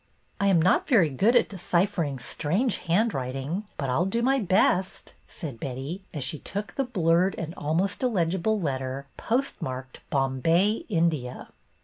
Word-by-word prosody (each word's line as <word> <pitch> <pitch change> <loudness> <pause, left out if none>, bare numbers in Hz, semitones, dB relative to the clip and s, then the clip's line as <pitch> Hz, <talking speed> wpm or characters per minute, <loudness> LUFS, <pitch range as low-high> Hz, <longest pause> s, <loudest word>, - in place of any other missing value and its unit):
" - - -39
I 200 - +3
am 190 -4 +5
not 180 +3 +3
very 195 - +5
good 200 - +2
at - - +5
deciphering 175 -5 0
strange 170 - -1
handwriting, 165 - -1
but 140 - -2
I 125 - +1
'll 175 - +2
do 230 +5 0
my 270 +2 +3
best," 190 -2 +1
said 140 -10 -8
Betty, 135 - -5
as 150 -6 -4
she 140 +3 -3
took 205 +1 -5
the 275 - 0
blurred 180 -5 +2
and 165 0 -4
almost 165 +6 -1
illegible 200 -2 +1
letter, 135 -4 -3
postmarked 130 - -2
Bombay, 165 - +2
India. 165 - -1
170 Hz, 150 wpm, -26 LUFS, 140-200 Hz, -, am